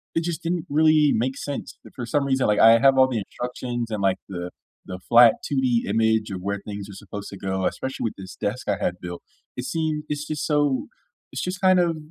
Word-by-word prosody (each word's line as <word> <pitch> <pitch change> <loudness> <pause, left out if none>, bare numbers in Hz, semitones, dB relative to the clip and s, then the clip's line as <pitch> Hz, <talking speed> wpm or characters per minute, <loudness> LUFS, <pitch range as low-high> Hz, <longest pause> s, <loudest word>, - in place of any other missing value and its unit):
it 165 - +1
just 170 -1 -3
didn't 170 0 -2
really 155 0 +4
make 130 +4 -1
sense 145 -1 -6
that - - -15
for 125 - -5
some 140 +4 +1
reason 135 -1 +1
like 105 - +2
I 115 +1 +7
have 135 +2 +5
all 130 0 +6
the 125 -4 -2
instructions 120 +2 -5
and 105 -2 -2
like 95 -1 +2
the 90 -2 -5 0.4
the 90 0 -7
flat 120 -1 +8
2D 130 -4 +1
image 110 -1 +1
of 95 - -5
where 100 +1 -2
things 100 -1 -6
are - - -9
supposed 100 0 -8
to 100 - -9
go, 95 -1 -2
especially 130 0 -3
with 110 - -3
this 95 -1 -9
desk 110 +6 -4
I 100 - +1
had 90 - 0
built. 90 -1 -7 0.3
It 125 - -5
seems 155 -1 -2
it's 150 0 -3
just 155 -2 -3
so 145 -3 +1 0.4
it's - - -4
just 180 +1 -4
kind 185 -1 +5
of 170 -2 +2
125 Hz, 230 wpm, -24 LUFS, 100-150 Hz, 0.4 s, flat